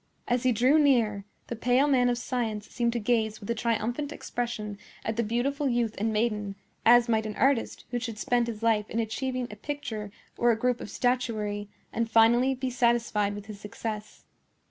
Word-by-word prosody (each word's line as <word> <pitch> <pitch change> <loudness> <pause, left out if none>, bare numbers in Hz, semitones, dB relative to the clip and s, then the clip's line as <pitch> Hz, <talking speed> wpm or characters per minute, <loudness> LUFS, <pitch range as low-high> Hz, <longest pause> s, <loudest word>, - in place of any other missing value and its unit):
As 245 0 +1
he 255 - +3
drew 255 +7 +4
near, 230 -9 +3 0.2
the 235 - -5
pale 250 +5 +3
man 250 -3 +4
of 240 - 0
science 230 -4 -3
seemed 235 -1 0
to 240 - -1
gaze 220 -1 0
with 200 - -10
a - - +3
triumphant 235 +5 -1
expression 220 -7 -4 0.3
at 220 - -1
the 235 - +1
beautiful 265 +6 0
youth 240 -3 0
and 220 +2 0
maiden, 210 -2 -1 0.3
as 240 +1 +7
might 220 -1 +1
an 210 - -5
artist 270 -3 +1
who 245 - 0
should 230 -2 -5
spend 240 +2 +1
his 225 -1 -5
life 215 -2 +2
in 230 - -2
achieving 255 +3 -2
a - - -7
picture 220 -5 -5 0.3
or 240 - +4
a 230 - +3
group 250 +1 0
of - - -7
statuary 215 -4 -1 0.2
and 230 0 -1
finally 235 +4 +5
be 260 0 -3
satisfied 235 -4 +1
with 205 -1 -8
his 210 -2 -9
success. 210 0 -6
235 Hz, 190 wpm, -28 LUFS, 215-245 Hz, 0.3 s, as